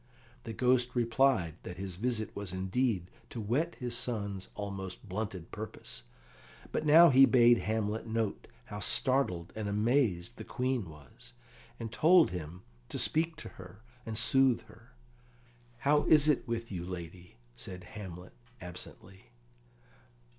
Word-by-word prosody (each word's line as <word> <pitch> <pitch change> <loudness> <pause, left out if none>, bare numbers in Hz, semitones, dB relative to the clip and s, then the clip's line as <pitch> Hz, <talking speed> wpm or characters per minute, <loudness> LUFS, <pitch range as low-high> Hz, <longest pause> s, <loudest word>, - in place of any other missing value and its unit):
The 115 - -5
Ghost 125 +1 +2
replied 115 - +2
that 90 - -8
his 95 -2 -5
visit 115 0 -1
was 100 -3 -5
indeed 95 0 -1 0.2
to 120 - -6
whet 130 +11 -1
his 120 -1 -4
son's 100 -6 -2
almost 100 -1 -6
blunted 95 -3 -5
purpose. 105 - -8 0.7
But 155 - -2
now 165 +2 +8
he 135 +1 +7
bade 120 -2 +5
Hamlet 110 +1 -2
note 110 -2 -2 0.2
how 105 - -7
startled 105 - +2
and 110 -2 -3
amazed 110 -1 0
the - - -7
Queen 125 -7 -2
was, 70 -5 -15 0.5
and 115 -1 -5
told 165 +8 +5
him 90 +1 -7 0.3
to - - -5
speak 160 +1 +2
to - - -9
her 95 +3 -14 0.2
and 110 -2 -5
soothe 130 0 +4
her. 115 +2 -19 0.8
"How 145 +4 +2
is 150 -1 +5
it 150 -4 +2
with 115 -1 -4
you, 90 -3 -4
lady?" 90 0 -8 0.2
said 90 +8 -6
Hamlet 90 -3 -10 0.3
absently. 90 +2 -10
110 Hz, 140 wpm, -31 LUFS, 95-125 Hz, 0.8 s, now